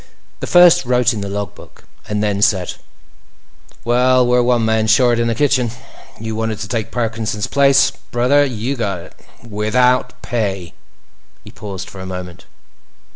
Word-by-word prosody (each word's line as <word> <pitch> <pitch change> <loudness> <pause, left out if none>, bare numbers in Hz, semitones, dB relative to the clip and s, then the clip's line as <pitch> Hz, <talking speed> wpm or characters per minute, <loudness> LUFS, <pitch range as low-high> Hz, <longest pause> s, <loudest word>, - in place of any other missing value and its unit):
The - - -5
First 175 -3 +6
wrote 125 -1 +2
in 105 - -5
the 100 - -5
log 100 0 -4
book, - - -16 0.3
and 105 0 -1
then 100 -1 -1
said: 95 -4 +1 1.1
"Well, 125 +1 +3
we're 125 0 +3
one 120 -2 +1
man 110 0 +1
short 120 +1 +3
in 120 - +1
the 115 - -1
kitchen. 130 -2 +1 0.5
You 110 0 -5
wanted 110 -1 -2
to 100 - -5
take 110 +1 -3
Parkinson's 115 -3 -3
place; 140 -1 +3 0.2
brother, 125 +4 +3
you've 125 0 -3
got 100 -5 -2
it—without 125 +7 -2
pay." 95 -7 -3 0.7
He - - -13
paused 100 -3 -8
for 95 - -11
a 95 - -7
moment. 90 -2 -8
115 Hz, 155 wpm, -17 LUFS, 105-125 Hz, 1.1 s, First